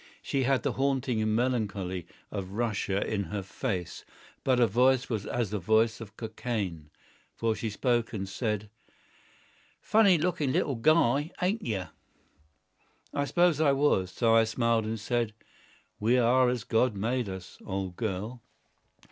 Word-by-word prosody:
She 135 -2 0
had 130 -3 +2
the - - +1
haunting 135 -3 0 0.2
melancholy 100 -8 -1 0.2
of 95 -2 -5
Russia 105 -3 -1
in 100 -2 -1
her 100 +3 -4
face, 95 -3 -4 0.4
but 130 -2 +3
her 120 - +5
voice 125 +4 +3
was 105 -3 -2
as 120 -5 -1
the 105 - -1
voice 110 +4 +2
of 110 -1 -10
Cockaigne. 110 -8 -4 0.5
For 115 -1 0
she 110 +1 -3
spoke 120 +2 0
and 100 -4 -4
said:— 105 0 -3 1.1
"Funny 205 -4 +4
looking 155 -4 0
little 140 - +1
guy, 145 +2 +3
ain't 200 +5 0
you?" 100 - -2 1.3
I 145 0 0
suppose 175 0 +3
I 145 -3 +4
was. 135 -10 +2
So 115 +4 +2
I 115 0 +6
smiled 115 0 +1
and 110 +1 -3
said: 115 0 -1 0.6
"We 115 +4 +3
are 125 +1 +4
as 125 -2 -2
God 115 -1 +2
made 115 +2 -1
us, 95 -1 -8
old 95 -2 -4
girl." 110 +3 -4
115 Hz, 145 wpm, -29 LUFS, 105-130 Hz, 1.3 s, I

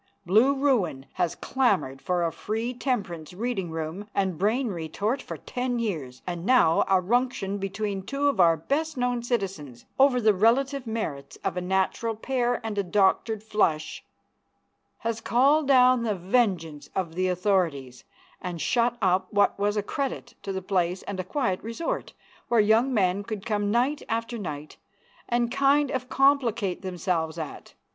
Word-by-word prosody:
Blue 225 +10 +4
Ruin 245 - +1
has 175 -1 -1
clamored 195 - 0
for 180 -2 0
a 165 - 0
free 220 +8 -3
temperance 190 - -3
reading 210 -4 -2
room 160 +5 -5
and 190 -3 +1
brain 220 - +1
retort 200 - -2
for - - -7
ten 250 -1 -3
years, 155 - -4
and 175 -2 -4
now 195 -8 +4
a 190 -1 +4
ruction 215 -1 0
between 195 0 -3
two 275 +8 -1
of 280 - 0
our 165 -2 +5
best 295 - -2
known 245 -1 0
citizens, 190 - -3
over 265 -2 +5
the 215 -2 +4
relative 255 +6 +2
merits 190 -12 -4
of - - -1
a 180 - -2
natural 190 +5 0
pair 245 +1 0
and 210 -2 -2
a - - +1
doctored 205 +3 +1
flush, 165 -8 0 1.0
has 230 -1 -2
called 275 +6 +3
down 255 -2 +5
the 220 -3 0
vengeance 180 -6 0
of 180 -4 -2
the 185 +2 0
authorities, 175 -9 0 0.4
and 175 -2 -5
shut 240 +5 +1
up 185 0 +2
what 205 -1 +2
was 205 +1 +1
a 205 - 0
credit 275 +5 -4
to 195 - -4
the 190 -1 -4
place 180 -1 0
and 200 -2 -5
a - - -1
quiet 190 -2 -1
resort, 230 +9 -4 0.3
where 235 - +3
young 220 +5 +4
men 195 -4 +2
could 210 -2 -6
come 205 -2 0
night 250 +7 +1
after 230 +1 -2
night 150 -6 -6 0.5
and 240 -1 +1
kind 275 +1 +3
of 255 -2 -3
complicate 240 -8 +2
themselves 175 -3 -2
at. 160 -2 -7
205 Hz, 160 wpm, -26 LUFS, 180-245 Hz, 1.0 s, our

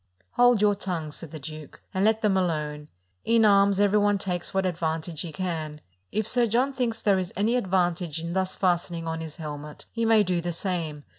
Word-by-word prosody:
"Hold 245 -3 +4
your 205 -1 +5
tongues," 175 -7 -4
said 165 - -9
the 155 - -8
duke, 155 0 -10
"and 190 - 0
let 220 +1 +2
them 205 -2 +3
alone: 150 -5 -1 0.4
in 230 -1 +4
arms 200 -1 +5
every 205 +1 +4
one 205 0 +3
takes 180 -3 -3
what 190 0 0
advantage 165 -2 -2
he 170 - -4
can: 160 -3 -4 0.3
if 215 0 -1
Sir 240 0 +3
John 250 +5 +1
thinks 235 -4 -1
there 200 -2 +3
is 180 -1 -4
any 215 +5 +1
advantage 180 -6 0
in 170 +1 -4
thus 190 0 -1
fasten 175 -2 0
ing 165 0 -5
on 160 0 -3
his 160 0 -7
helmet, 150 -2 -7
he 230 - -2
may 225 -2 +5
do 180 -2 0
the 175 0 -3
same. 165 -5 -3
185 Hz, 210 wpm, -26 LUFS, 160-205 Hz, 0.4 s, your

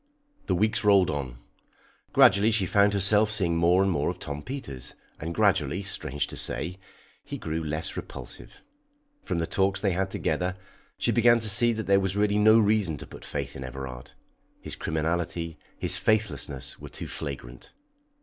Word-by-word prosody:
The 95 - +2
weeks 110 +4 +1
rolled 100 -3 +5
on. 65 -6 -4 0.7
Gradually 100 +3 +6
she 110 -4 +1
found 100 +2 +3
herself 105 +2 +4
seeing 95 -6 +2
more 85 +3 +4
and 95 - +1
more 75 -4 0
of - - -4
Tom 70 +1 -6
Peters, 70 - -7 0.2
and 80 +2 -4
gradually, 95 -4 +1
strange 75 -7 -2
to - - -8
say, 90 +3 0 0.4
he - - -6
grew 80 +1 -3
less 75 +1 -3
repulsive. - - -8 0.6
From 90 - -3
the 85 - 0
talks 95 +2 +1
they 100 -1 +1
had 95 +2 -1
together, 95 0 -2 0.4
she - - +1
began 120 0 +5
to 110 -2 +1
see 120 +4 +4
that 110 -1 -4
there 100 0 +4
was 95 0 -1
really 105 0 +2
no 110 +1 +6
reason 105 -7 +2
to - - -9
put - - -12
faith - - -5
in 65 - -6
Everard; 65 -1 -8 0.5
his - - -5
criminality, 85 0 -2 0.2
his - - 0
faithlessness, 105 -11 -1
were - - -9
too - - -7
flagrant. 65 -3 -7
95 Hz, 170 wpm, -27 LUFS, 75-105 Hz, 0.7 s, Gradually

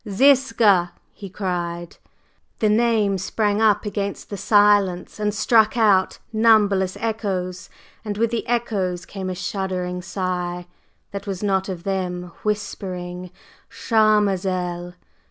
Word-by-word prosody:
"Ziska!" 225 -6 +4 0.2
he 200 -2 -9
cried. 175 -3 -4 0.6
The 215 - +2
name 215 -3 +2
sprang 205 +2 0
up 210 -1 +3
against 200 -1 -4
the - - -3
silence 205 -3 +2
and 210 0 0
struck 215 +2 +3
out 205 -4 +3 0.2
numberless 205 -4 +3
echoes, 195 -5 -3 0.3
and 210 -2 -4
with 230 +1 +1
the 235 - -3
echoes 200 -7 -1
came 190 -2 -6
a 185 - -3
shuddering 180 -1 -3
sigh, 180 -1 -3 0.5
that 200 +1 -7
was 195 0 -4
not 190 -1 0
of 175 -3 -6
them, 180 -2 -3
whispering: 185 -4 -4 0.4
"Charmazel!" 190 -5 +1
195 Hz, 120 wpm, -22 LUFS, 180-215 Hz, 0.6 s, Ziska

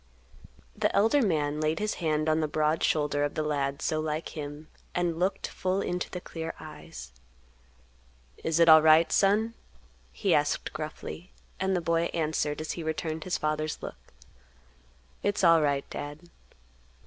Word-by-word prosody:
The - - 0
elder 225 +8 +4
man 150 - 0
laid 155 +1 +1
his 210 +3 -1
hand 155 -1 +1
on 155 0 +3
the 155 - +1
broad 155 +1 +1
shoulder 145 -1 +1
of 145 - -2
the 155 - 0
lad 140 -1 -1
so 155 - 0
like 155 +1 -2
him, 150 0 -7 0.3
and 175 -2 0
looked 185 +3 0
full 185 +1 -1
into 180 -2 -2
the 180 - -5
clear 165 -2 -6
eyes. 155 - -10 1.3
"Is 160 0 +1
it 170 - +6
alright, 160 +1 +7
son?" 210 +3 +3 0.6
he 65 - +1
asked - - +1
gruffly; 75 -5 -7 0.3
and 190 0 +1
the 175 - 0
boy 165 0 +1
answered, 155 -2 -1
as 155 - -3
he 170 - -5
returned 160 0 -3
his 185 - 0
father's 155 0 -1
look, - - -7 1.2
"It's 205 -1 0
alright, 150 -5 +4
Dad." 145 +1 -6
155 Hz, 150 wpm, -28 LUFS, 150-170 Hz, 1.3 s, alright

